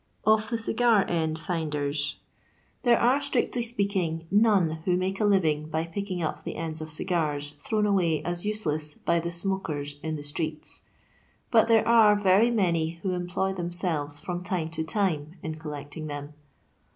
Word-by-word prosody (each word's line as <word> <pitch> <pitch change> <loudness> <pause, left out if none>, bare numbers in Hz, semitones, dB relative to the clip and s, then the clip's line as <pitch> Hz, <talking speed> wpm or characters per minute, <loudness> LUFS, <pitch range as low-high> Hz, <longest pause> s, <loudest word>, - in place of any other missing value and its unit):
' - - -41
' - - -28
Of 215 0 +4
Tni 230 -1 -1
CiOAft 230 -6 +4
Ein> 160 -2 0
FixDBaa. 155 -4 -2 0.9
TnBnB 240 -3 +5
are, 260 +4 +4
strictly 260 -3 0
speaking, 195 -8 -1
none 200 -7 +3
who 180 -1 +2
make 190 +1 -2
a 215 - +2
living 160 -7 +2
by 160 0 0
picking 185 0 -4
up 155 - -3
the - - -5
cifds 160 -1 -4
of 155 - -6
cigars 155 -3 -1
thrown 215 -1 +1
away 180 -6 +2
as 175 0 -3
useless 155 -8 -2
by 170 0 +1
the 170 +1 -3
smokers 165 -6 -3
in 160 -1 -3
tha 145 - -6
streets, 155 +1 -4 0.7
but 225 -2 +5
there 225 -1 +4
are 225 -3 +7
very 205 +3 +4
many 170 -7 +1
who 190 - 0
employ 180 +2 -1
themselves 170 -5 -2
iVom 175 0 -4
time 180 -3 -2
to 160 -1 -2
timfein 165 -3 -1
eolleeting 155 -1 -6
them. 145 0 -6
175 Hz, 165 wpm, -27 LUFS, 155-205 Hz, 0.9 s, are